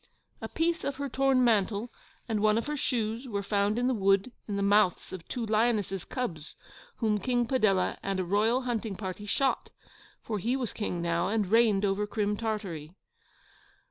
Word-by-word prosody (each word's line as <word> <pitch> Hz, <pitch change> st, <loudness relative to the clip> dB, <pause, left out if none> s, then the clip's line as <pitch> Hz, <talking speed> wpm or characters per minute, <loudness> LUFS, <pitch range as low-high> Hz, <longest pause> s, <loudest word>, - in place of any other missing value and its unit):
A -, -, -5 dB
piece 335 Hz, +1 st, 0 dB
of 280 Hz, -, -2 dB
her 280 Hz, +1 st, -3 dB
torn 270 Hz, -1 st, +2 dB
mantle 220 Hz, 0 st, +1 dB, 0.4 s
and 220 Hz, -3 st, 0 dB
one 215 Hz, +1 st, +3 dB
of 230 Hz, -, -1 dB
her 300 Hz, -, -2 dB
shoes 235 Hz, -2 st, -1 dB
were 200 Hz, -4 st, -3 dB
found 205 Hz, +1 st, +1 dB
in 245 Hz, -, +1 dB
the 260 Hz, -, +2 dB
wood 195 Hz, +1 st, +2 dB, 0.2 s
in 205 Hz, -, -3 dB
the 200 Hz, -, 0 dB
mouths 200 Hz, -3 st, +2 dB
of 185 Hz, -3 st, -8 dB
two 245 Hz, -3 st, -3 dB
lionesses' 215 Hz, -4 st, +1 dB
cubs 170 Hz, -12 st, -4 dB, 0.4 s
whom 215 Hz, -3 st, 0 dB
KING 245 Hz, +3 st, +1 dB
PADELLA 215 Hz, -7 st, +1 dB
and 195 Hz, -1 st, -2 dB
a -, -, +1 dB
royal 215 Hz, +7 st, +2 dB
hunting 225 Hz, -4 st, -2 dB
party 190 Hz, +1 st, -6 dB
shot 270 Hz, +6 st, 0 dB, 0.5 s
for 215 Hz, -2 st, -3 dB
he 235 Hz, +7 st, 0 dB
was 255 Hz, -4 st, -2 dB
King 180 Hz, -5 st, -3 dB
now, 170 Hz, +1 st, 0 dB
and 210 Hz, +1 st, +1 dB
reigned 220 Hz, -3 st, +4 dB
over 200 Hz, +1 st, 0 dB
Crim 210 Hz, 0 st, -1 dB
Tartary. 195 Hz, -8 st, -4 dB
215 Hz, 180 wpm, -29 LUFS, 195-240 Hz, 0.5 s, reigned